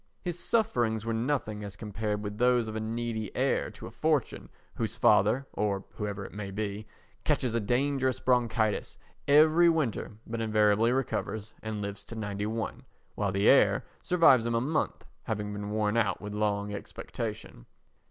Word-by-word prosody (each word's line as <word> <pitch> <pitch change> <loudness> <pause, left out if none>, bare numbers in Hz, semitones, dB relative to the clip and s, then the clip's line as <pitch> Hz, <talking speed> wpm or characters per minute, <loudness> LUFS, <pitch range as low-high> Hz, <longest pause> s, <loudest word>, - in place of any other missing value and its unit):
His 175 -1 -3
sufferings 120 - +1
were 115 - -1
nothing 115 -3 -1
as 100 -1 -7
compared 105 0 -3
with 105 +1 -5
those 125 -2 +3
of 110 - -5
a - - -1
needy 110 -1 -3
heir - - +1
to - - -11
a - - -8
fortune - - -1 0.2
whose 115 0 -3
father, 115 +3 +4
or 100 -1 -1
whoever 100 -2 -4
it - - -10
may 100 -1 -5
be, 105 +1 -4 0.4
catches 125 -3 +1
a 115 - +2
dangerous 130 +3 +1
bronchitis 115 -4 +1 0.3
every 155 +4 +6
winter 155 -10 -1
but 115 0 -4
invariably 110 +1 +3
recovers 110 -4 -2
and 110 -1 -4
lives 100 0 -5
to 115 - -8
91, 110 +1 -3 0.3
while 100 -2 -1
the 100 +1 +1
heir - - +5 0.2
survives 135 -10 +5
him 115 - 0
a - - +3
month 150 +6 -1 0.2
having 105 -1 -3
been 105 0 -5
worn 105 0 0
out 100 -5 +1
with 105 0 -7
long 105 -1 -1
expectation. - - -6
110 Hz, 160 wpm, -29 LUFS, 105-120 Hz, 0.4 s, every